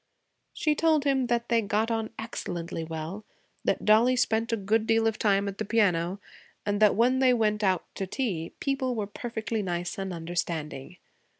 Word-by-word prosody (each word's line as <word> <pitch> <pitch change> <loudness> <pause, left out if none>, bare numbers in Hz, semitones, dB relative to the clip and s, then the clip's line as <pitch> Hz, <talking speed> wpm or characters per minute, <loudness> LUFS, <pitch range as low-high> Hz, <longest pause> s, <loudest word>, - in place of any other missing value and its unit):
She 305 - +1
told 310 -1 +2
him 270 -3 +2
that 235 0 0
they 230 -1 +3
got 215 +2 0
on 225 -1 -1
excellently 175 -7 -5
well, 160 +5 -5 0.4
that - - 0
Dollie 225 +4 +5
spent 225 -1 +1
a 230 - +1
good 215 +2 +1
deal 225 0 +3
of 225 -1 0
time 200 -1 +2
at 200 0 -5
the - - 0
piano, 190 -4 +1 0.5
and 205 0 0
that 210 -2 +6
when 250 +4 +3
they 255 -2 +5
went 215 -2 +1
out 185 -2 +2
to 195 - -2
tea 185 -9 -2
people 270 -3 -1
were 215 -2 -1
perfectly 220 +1 -4
nice 175 -1 -3
and 195 -1 -3
understanding. 170 -2 -4
215 Hz, 180 wpm, -28 LUFS, 185-235 Hz, 0.5 s, that